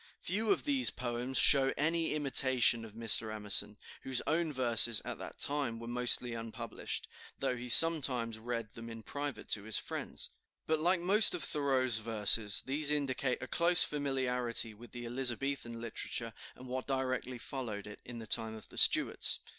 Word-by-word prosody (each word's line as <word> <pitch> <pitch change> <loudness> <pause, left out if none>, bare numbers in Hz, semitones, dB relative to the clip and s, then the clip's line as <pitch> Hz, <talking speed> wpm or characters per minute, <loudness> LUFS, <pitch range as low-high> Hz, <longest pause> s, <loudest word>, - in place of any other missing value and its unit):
Few 210 +5 -3
of - - 0
these 275 -4 +3
poems 125 +1 -5
show 135 -2 +6
any 160 +1 -2
imitation 130 -5 +2
of 110 -2 -12
Mr. 110 -1 +3
Emerson, 105 -1 +2 0.2
whose 130 -2 -2
own 160 +1 -2
verses 120 -4 +3
at - - -7
that - - -9
time 140 -5 -1
were 115 - -10
mostly 125 0 +2
unpublished, 115 -1 -7 0.3
though 125 - -3
he 125 0 -9
sometimes 125 -7 +4
read 115 -2 -6
them 115 0 -11
in 115 -1 -11
private 145 -1 -7
to 105 - +2
his 110 0 -1
friends. - - -5 0.3
But 160 0 -1
like 175 +2 0
most 200 +3 +6
of 175 - -4
Thoreau's 130 -5 -1
verses, 110 -1 +1
these 145 +2 0
indicate 140 -3 -3
a - - -8
close 175 +1 +5
familiarity 125 -5 -2
with 115 +2 -16
the 120 -1 -9
Elizabethan 130 +1 -1
literature, 115 0 -6 0.2
and 130 - -14
what 130 +1 -6
directly 130 -2 -4
followed 115 -5 -7
it, 105 0 -12
in 120 - -11
the 115 - -9
time 110 0 -1
of 110 -4 -13
the - - -4
Stuarts. - - +3
125 Hz, 170 wpm, -31 LUFS, 115-140 Hz, 0.3 s, show